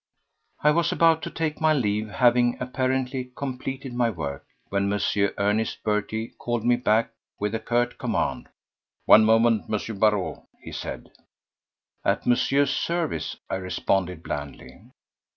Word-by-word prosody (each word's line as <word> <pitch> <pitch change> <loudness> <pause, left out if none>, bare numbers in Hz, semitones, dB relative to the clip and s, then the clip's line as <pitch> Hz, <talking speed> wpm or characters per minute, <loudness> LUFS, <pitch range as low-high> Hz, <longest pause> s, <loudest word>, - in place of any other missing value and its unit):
I 150 - +6
was 170 +2 +2
about 165 -1 +4
to - - -4
take 160 -1 -3
my 155 0 +4
leave, 105 -5 0
having 120 +2 +3
apparently 130 0 -2
completed 135 -1 -5
my 120 -1 +2
work, 75 -9 -5 0.3
when 100 0 0
M. 105 - 0 0.4
Ernest 105 +2 0
Berty 110 +1 -1
called 120 -1 -2
me 120 0 +5
back 115 -2 +1 0.3
with 105 +1 -2
a 115 - -1
curt 120 +2 -1
command. - - -2 0.6
"One 110 - +8
moment, 115 -3 +4
M. 110 -1 -3
Barrot," 105 -6 +1 0.2
he - - -10
said. - - -6 0.9
"At - - 0
Monsieur's 135 +3 +2
service," 170 -2 -2
I - - -2
responded 90 -2 -1
blandly. 70 -2 -7
115 Hz, 135 wpm, -25 LUFS, 105-130 Hz, 0.9 s, One